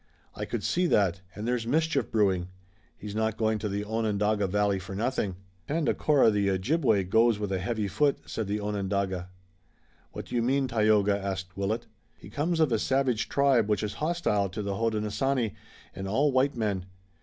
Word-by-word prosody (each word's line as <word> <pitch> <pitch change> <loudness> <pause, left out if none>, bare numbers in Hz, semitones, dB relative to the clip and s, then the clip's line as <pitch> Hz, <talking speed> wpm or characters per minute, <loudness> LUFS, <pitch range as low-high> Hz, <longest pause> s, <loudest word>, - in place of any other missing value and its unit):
I - - -5
could - - -4
see 180 +1 +1
that, 95 - +2
and 105 +2 -5
there's 120 -2 -1
mischief 160 +4 +1
brewing. 95 -5 +2 0.5
He's 105 -1 -7
not 110 0 -1
going 110 -1 +1
to 105 0 -3
the 100 +1 -3
Onondaga 105 -2 0
Valley 100 0 +1
for 95 +1 -8
nothing." 110 -3 -1 0.3
"Tandakora, 150 -4 +3
the 100 -1 +1
Ojibway, 105 - +2
goes 110 +4 +3
with 105 -2 -3
a 95 - 0
heavy 105 +2 -2
foot," 140 +8 +2
said 110 -3 -4
the 105 +1 -1
Onondaga. 100 -3 -2 0.8
"What - - -7
do - - -11
you 120 - +2
mean, 135 +3 +1
Tayoga?" 105 -3 +3
asked 95 -1 -4
Willet. 105 +4 -2 0.3
"He 100 - -13
comes 160 +7 -1
of 155 -5 +3
a 115 - +2
savage 130 -3 +1
tribe, 135 -6 +3
which 105 -1 +1
is 105 - -3
hostile 150 - +1
to 105 +3 -5
the 100 0 -2
Hodenosaunee 115 +2 0 0.4
and 95 +1 -5
all 140 +9 +2
white 130 +2 +2
men. 100 -5 -1
105 Hz, 180 wpm, -28 LUFS, 100-125 Hz, 0.8 s, Tandakora